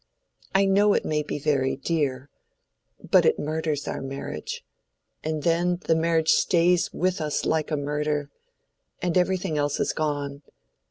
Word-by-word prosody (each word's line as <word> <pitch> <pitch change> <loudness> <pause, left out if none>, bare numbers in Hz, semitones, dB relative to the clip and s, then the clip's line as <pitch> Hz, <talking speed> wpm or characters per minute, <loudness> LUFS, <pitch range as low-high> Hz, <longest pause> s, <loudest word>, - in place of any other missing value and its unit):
I 195 0 +5
know 200 +1 +4
it - - 0
may 150 -1 0
be 150 - -4
very 140 -3 +1
dear—but 135 - -2
it - - +3
murders 155 -1 -2
our - - -3
marriage—and 135 - -7
then 175 +1 +2
the - - +2
marriage 160 0 +2
stays 175 0 +3
with 185 0 -1
us 150 -1 -1
like 160 -1 0
a 155 - 0
murder—and 150 - -4
everything 180 -3 +1
else 145 0 0
is - - 0
gone. 145 -2 -2
155 Hz, 130 wpm, -25 LUFS, 145-170 Hz, -, I